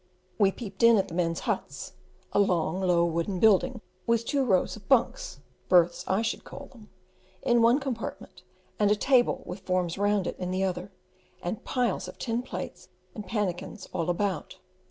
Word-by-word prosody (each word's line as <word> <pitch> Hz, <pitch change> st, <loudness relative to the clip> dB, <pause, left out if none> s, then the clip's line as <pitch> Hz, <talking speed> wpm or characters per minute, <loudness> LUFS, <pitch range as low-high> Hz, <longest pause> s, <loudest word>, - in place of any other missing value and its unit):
We 200 Hz, -2 st, +5 dB
peeped 195 Hz, -3 st, -8 dB
in 230 Hz, -1 st, +7 dB
at 195 Hz, -, 0 dB
the -, -, -9 dB
men's 165 Hz, -1 st, 0 dB
huts -, -, -3 dB, 0.4 s
a -, -, +3 dB
long, 180 Hz, -2 st, +1 dB
low 175 Hz, -2 st, +3 dB
wooden 170 Hz, +3 st, -1 dB
building, 225 Hz, +4 st, +4 dB, 0.3 s
with 230 Hz, 0 st, +2 dB
two 280 Hz, +1 st, +1 dB
rows 190 Hz, -8 st, +2 dB
of 210 Hz, -2 st, -15 dB
"bunks" -, -, +1 dB, 0.3 s
(berths, 175 Hz, -1 st, +4 dB
I 195 Hz, +4 st, +1 dB
should 225 Hz, -, -2 dB
call 280 Hz, -, -10 dB
their) 240 Hz, -, -15 dB, 0.6 s
in 240 Hz, -1 st, +3 dB
one 235 Hz, +4 st, +5 dB
compartment, 260 Hz, -5 st, -6 dB, 0.4 s
and 205 Hz, -1 st, +4 dB
a 210 Hz, -, +4 dB
table 250 Hz, +3 st, +2 dB
with 180 Hz, +3 st, -6 dB
forms 185 Hz, -1 st, -1 dB
round 205 Hz, -2 st, +2 dB
it -, -, -4 dB
in 180 Hz, -1 st, -3 dB
the 185 Hz, +1 st, 0 dB
other, 185 Hz, +1 st, -2 dB, 0.5 s
and 175 Hz, +5 st, -4 dB
piles 245 Hz, -6 st, -1 dB
of -, -, -10 dB
tin 235 Hz, -1 st, -1 dB
plates 255 Hz, -, -7 dB, 0.2 s
and 210 Hz, -, -8 dB
pannikins 190 Hz, -2 st, -3 dB
all 165 Hz, 0 st, -1 dB
about. 190 Hz, +1 st, -2 dB
200 Hz, 175 wpm, -28 LUFS, 180-230 Hz, 0.6 s, in